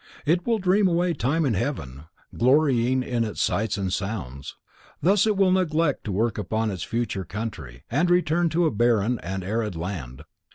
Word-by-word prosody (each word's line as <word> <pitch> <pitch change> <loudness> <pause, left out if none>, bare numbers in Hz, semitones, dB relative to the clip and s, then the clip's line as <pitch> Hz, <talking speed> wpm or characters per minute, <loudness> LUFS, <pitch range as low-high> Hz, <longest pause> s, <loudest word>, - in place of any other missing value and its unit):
It 175 +6 +1
will 230 -1 +2
dream 190 +1 +3
away 175 0 +1
time 155 +4 0
in 130 - +1
heaven, 80 - -3 0.3
glorying 130 -1 +3
in 120 -2 -1
its 110 - -5
sights 110 0 0
and 95 -2 -2
sounds. 70 - -5 0.4
Thus 195 +6 +3
it 210 -2 +1
will 195 -2 +4
neglect 165 -5 +1
to 105 - -3
work 110 +3 0
upon 110 +2 -1
its 95 -4 -6
future 115 -3 -2
country 80 - -7
and 150 +9 +1
return 175 -1 +2
to 170 +2 +1
a 160 - +2
barren 115 +1 +2
and 95 +1 -5
arid 105 0 -2
land. 80 -6 -6
120 Hz, 175 wpm, -25 LUFS, 100-165 Hz, 0.4 s, will